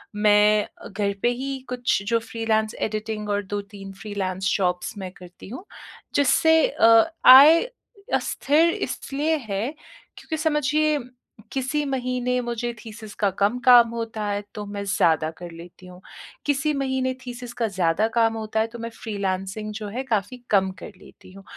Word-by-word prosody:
मैं 210 Hz, 0 st, +4 dB
अ, -, -, -14 dB
घर 200 Hz, 0 st, -2 dB
पे 240 Hz, -, +3 dB
ही 265 Hz, +2 st, -3 dB
कुछ 245 Hz, -4 st, 0 dB
जो 230 Hz, +1 st, +2 dB
फ्रीलांस 225 Hz, -1 st, -1 dB
एडिटिंग 215 Hz, 0 st, -3 dB
और 205 Hz, 0 st, 0 dB
2-3 200 Hz, 0 st, -7 dB
फ्रीलांस 190 Hz, -3 st, -2 dB
जॉब्स 180 Hz, 0 st, -2 dB
मैं 190 Hz, -2 st, -6 dB
करती 180 Hz, 0 st, -13 dB
हूँ, 305 Hz, -, -8 dB, 0.5 s
जिससे 320 Hz, +3 st, +4 dB
अ, 225 Hz, +7 st, +4 dB
आय 290 Hz, +6 st, +10 dB, 0.5 s
अस्थिर 315 Hz, +4 st, +2 dB
इसलिए 300 Hz, +4 st, -2 dB
है 200 Hz, +4 st, -1 dB, 0.5 s
क्योंकि 315 Hz, -, -5 dB
समझिए 305 Hz, -1 st, +1 dB, 0.5 s
किसी 270 Hz, +3 st, -1 dB
महीने 250 Hz, -2 st, -1 dB
मुझे 240 Hz, 0 st, -3 dB
थीसिस 220 Hz, -1 st, -10 dB
का 205 Hz, -, +2 dB
कम 205 Hz, +5 st, +2 dB
काम 240 Hz, -2 st, +8 dB
होता 225 Hz, -2 st, -4 dB
है 205 Hz, 0 st, -2 dB
तो 210 Hz, -1 st, -5 dB
मैं 200 Hz, 0 st, -5 dB
ज़्यादा 160 Hz, -5 st, +2 dB
कर 175 Hz, -1 st, -9 dB
लेती 175 Hz, +2 st, -13 dB
हूँ। 180 Hz, 0 st, -13 dB, 0.5 s
किसी 290 Hz, +1 st, +1 dB
महीने 265 Hz, -2 st, -1 dB
थीसिस 245 Hz, -1 st, -8 dB
का 235 Hz, -1 st, -1 dB
ज़्यादा 190 Hz, +1 st, +1 dB
काम 225 Hz, -1 st, +3 dB
होता 220 Hz, 0 st, -3 dB
है 220 Hz, -, +1 dB
तो 235 Hz, +1 st, -11 dB
मैं 230 Hz, 0 st, -5 dB
फ्रीलांसिंग 200 Hz, 0 st, -4 dB
जो 215 Hz, -1 st, -5 dB
है 245 Hz, +6 st, -4 dB
काफ़ी 230 Hz, -1 st, -2 dB
कम 190 Hz, -2 st, +3 dB
कर -, -, -9 dB
लेती -, -, -17 dB
हूँ। 195 Hz, 0 st, -13 dB
220 Hz, 160 wpm, -23 LUFS, 200-255 Hz, 0.5 s, आय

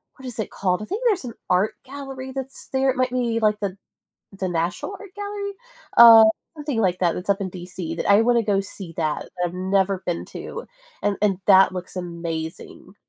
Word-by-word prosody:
what 265 Hz, -, -13 dB
is 245 Hz, -3 st, -6 dB
it 220 Hz, -, -2 dB
called? 185 Hz, 0 st, 0 dB
I -, -, -5 dB
think 410 Hz, +5 st, -4 dB
there's 405 Hz, -, +2 dB
an 235 Hz, -, -6 dB, 0.2 s
art 185 Hz, +4 st, +2 dB
gallery 270 Hz, -1 st, -7 dB
that's 270 Hz, 0 st, -7 dB
there, 265 Hz, 0 st, +1 dB
it 260 Hz, -, +1 dB
might 255 Hz, 0 st, +2 dB
be, 235 Hz, -2 st, 0 dB
like, 210 Hz, -1 st, +2 dB
the 200 Hz, -2 st, -3 dB, 0.6 s
the 190 Hz, -, -1 dB
National 175 Hz, -, -2 dB
Art 400 Hz, -2 st, -12 dB
Gallery? 405 Hz, 0 st, -4 dB, 0.5 s
Uh, 230 Hz, -1 st, +11 dB, 0.3 s
something 290 Hz, -6 st, -2 dB
like 180 Hz, -2 st, +1 dB
that 175 Hz, -3 st, +2 dB
that's 180 Hz, +3 st, -7 dB
up 200 Hz, -, +3 dB
in 190 Hz, -2 st, -3 dB
DC 175 Hz, -2 st, -6 dB
that -, -, -3 dB
I 200 Hz, +2 st, +7 dB
wanna 235 Hz, 0 st, +3 dB
go 200 Hz, -2 st, +2 dB
see 195 Hz, -3 st, -7 dB
that, 155 Hz, -2 st, -1 dB
that -, -, -16 dB
I've 175 Hz, -, -4 dB
never 190 Hz, +1 st, 0 dB
been 175 Hz, -1 st, -2 dB
to, 475 Hz, +1 st, -8 dB, 0.3 s
and 205 Hz, -1 st, +1 dB
and 200 Hz, -3 st, +2 dB
that 195 Hz, -1 st, +7 dB
looks 180 Hz, 0 st, -7 dB
amazing. 170 Hz, 0 st, -6 dB
205 Hz, 205 wpm, -23 LUFS, 180-255 Hz, 0.6 s, Uh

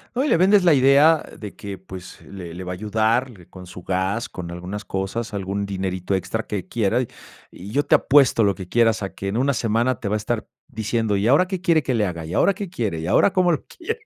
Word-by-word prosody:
No, 260 Hz, -, +1 dB
y -, -, 0 dB
le -, -, +4 dB
vendes 195 Hz, +2 st, +5 dB
la 170 Hz, -3 st, +5 dB
idea 140 Hz, +4 st, +5 dB
de 105 Hz, -2 st, -9 dB
que, 100 Hz, -2 st, -7 dB
pues, 95 Hz, -1 st, -11 dB
le 90 Hz, -4 st, -9 dB
le 90 Hz, +2 st, -7 dB
va 90 Hz, -, -5 dB
a -, -, -3 dB
ayudarle 110 Hz, 0 st, -1 dB
con 90 Hz, -1 st, -12 dB
su 90 Hz, 0 st, -11 dB
gas, 95 Hz, +5 st, -1 dB
con 85 Hz, -2 st, -7 dB
algunas 90 Hz, +4 st, -6 dB
cosas, 100 Hz, +4 st, -4 dB
algún 100 Hz, +1 st, -3 dB
dinerito 95 Hz, -1 st, -2 dB
extra 95 Hz, +5 st, -3 dB
que 100 Hz, -3 st, -5 dB
quiera, 115 Hz, +3 st, 0 dB
y 125 Hz, -, -3 dB, 0.4 s
y 100 Hz, +4 st, -10 dB
yo 145 Hz, +4 st, +1 dB
te -, -, +4 dB
apuesto 135 Hz, -5 st, +4 dB
lo 100 Hz, -1 st, +2 dB
que 95 Hz, -, -8 dB
quieras 115 Hz, +1 st, +2 dB
a 95 Hz, -, -5 dB
que, 100 Hz, -, -6 dB
en 100 Hz, +4 st, -2 dB
una 140 Hz, +2 st, +2 dB
semana, 115 Hz, +1 st, 0 dB
te 110 Hz, -, -4 dB
va 105 Hz, -, 0 dB
a -, -, +2 dB
estar 110 Hz, +1 st, -3 dB, 0.2 s
diciendo: 110 Hz, -1 st, -1 dB
"¿Y 100 Hz, +2 st, 0 dB
ahora 150 Hz, +9 st, +4 dB
qué 185 Hz, -2 st, -4 dB
quiere 165 Hz, -5 st, +3 dB
que 130 Hz, -, -1 dB
le 110 Hz, -3 st, +1 dB
haga? 85 Hz, -4 st, -5 dB
¿Y 80 Hz, -, -7 dB
ahora 200 Hz, -, +3 dB
qué 195 Hz, 0 st, -6 dB
quiere? 110 Hz, -, -3 dB
¿Y 80 Hz, -, -4 dB
ahora 110 Hz, -, +4 dB
cómo 180 Hz, -2 st, +3 dB
lo 155 Hz, -, -2 dB
quiere?" 450 Hz, +7 st, -6 dB
110 Hz, 250 wpm, -22 LUFS, 95-135 Hz, 0.4 s, vendes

